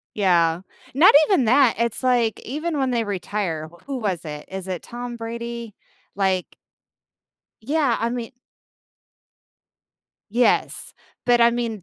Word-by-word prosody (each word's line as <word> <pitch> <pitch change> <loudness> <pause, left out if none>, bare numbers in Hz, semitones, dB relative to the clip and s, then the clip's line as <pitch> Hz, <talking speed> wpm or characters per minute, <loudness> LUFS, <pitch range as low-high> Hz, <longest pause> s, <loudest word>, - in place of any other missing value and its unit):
Yeah. 175 -4 +2 0.3
Not 310 +4 +6
even 365 - +3
that, 250 +1 +4
it's 235 0 -1
like, 240 -4 +1
even 305 +4 -3
when 265 -1 0
they 235 -2 0
retire 180 -5 -3 0.2
who 275 -2 -3
was 185 -7 -2
it? 150 -1 -7
Is 190 -1 -6
it 180 -3 -4
Tom 240 0 -7
Brady? 235 -1 -6 0.4
Like 190 -2 0 1.1
Yeah, 280 -2 +1
I 230 - +1
mean 240 -1 -5 2.0
Yes, 240 +2 +1 0.3
but, 240 -1 +4
I 235 0 +6
mean, 230 -5 -3
235 Hz, 125 wpm, -22 LUFS, 190-245 Hz, 2.0 s, Not